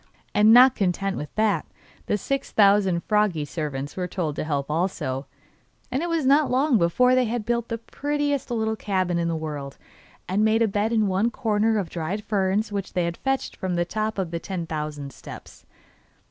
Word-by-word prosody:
And 210 +1 +5
not 250 +2 +8
content 195 -1 -1
with 150 - -5
that 215 -1 +2 0.4
the 210 - +1
six 275 +7 -3
thousand 195 -4 +4
froggy 210 -8 +1
servants 145 -2 -4
were 180 -1 -2
told 165 -5 -3
to - - -2
help 145 -2 -2
also, 150 -6 -2 0.6
and 260 +3 0
it 345 - -2
was 330 -4 0
not 285 +3 +4
long 260 -2 +3
before 250 +10 +3
they 255 0 +3
had 230 -1 -3
built 235 0 -1
the 230 - -3
prettiest 290 +4 -2
little 220 -2 -1
cabin 185 -5 -1
in 170 - 0
the 165 - -1
world, 150 -3 -5 0.5
and 195 +4 +1
made 220 +1 +3
a - - +3
bed 210 +2 0
in 220 -2 +2
one 195 +4 +1
corner 220 -2 +1
of 190 -5 -3
dried 180 +5 -3
ferns 205 +1 0
which 200 -2 -4
they 170 -1 0
fetched 270 0 -1
from 185 -3 -3
the 175 0 +1
top 215 +3 -2
of 185 -4 -2
the 170 - -2
ten 180 -1 -4
thousand 150 -3 -5
steps. - - -12
200 Hz, 190 wpm, -24 LUFS, 170-225 Hz, 0.6 s, not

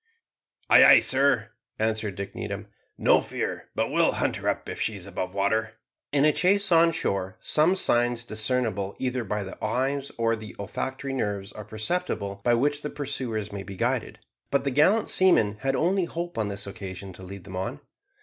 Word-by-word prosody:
"Ay, - - +9
ay, - - +9
sir," 130 -5 +2 0.3
answered 110 -2 -1
Dick 100 +1 -6
Needham. - - -5 0.3
"No - - +4
fear - - -4
but - - 0
we'll - - +3
hunt - - 0
her - - -1
up - - -2
if - - -5
she 110 - 0
is 95 -3 -6
above 90 -1 -5
water." 110 +3 0 0.4
In 145 0 +3
a 155 - +4
chase 195 +3 +2
on 165 0 +6
shore 95 - -2
some 160 +5 +3
signs 120 -7 +2
discernible 110 -3 -1
either 130 -1 -2
by 105 -1 -2
the 95 - -10
eyes 135 +5 -1
or 115 0 +2
the 110 -1 -10
olfactory 130 +6 -4
nerves 100 -6 -2
are 105 - -8
perceptible 110 - -3
by 120 -1 +4
which 145 +4 +1
the 150 - -4
pursuers 130 -8 -3
may 100 -1 -5
be 95 0 -8
guided, - - -1 0.3
but 140 - +1
the 140 - 0
gallant 185 - +3
seamen 110 - +4
had 135 +2 0
only 185 +4 +1
hope 170 +1 -5
on 110 -2 -1
this 100 0 -4
occasion 95 -1 -7
to 95 - -13
lead 95 0 -9
them 95 0 -9
on. 105 +10 -4
115 Hz, 190 wpm, -26 LUFS, 100-140 Hz, 0.4 s, Ay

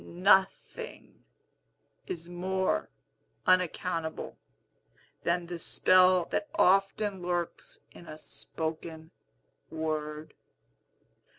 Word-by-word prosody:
Nothing 195 - 0 0.8
is 170 -1 -5
more 185 +2 -1 0.6
unaccountable 180 -3 0 0.9
than 170 0 0
the 175 0 -6
spell 185 0 +4
that 205 - -1
often 195 +1 +3
lurks 175 -1 -3
in 170 - -14
a 155 - -8
spoken 160 +1 -6 0.6
word. 155 -1 -4
175 Hz, 75 wpm, -30 LUFS, 160-185 Hz, 0.9 s, spell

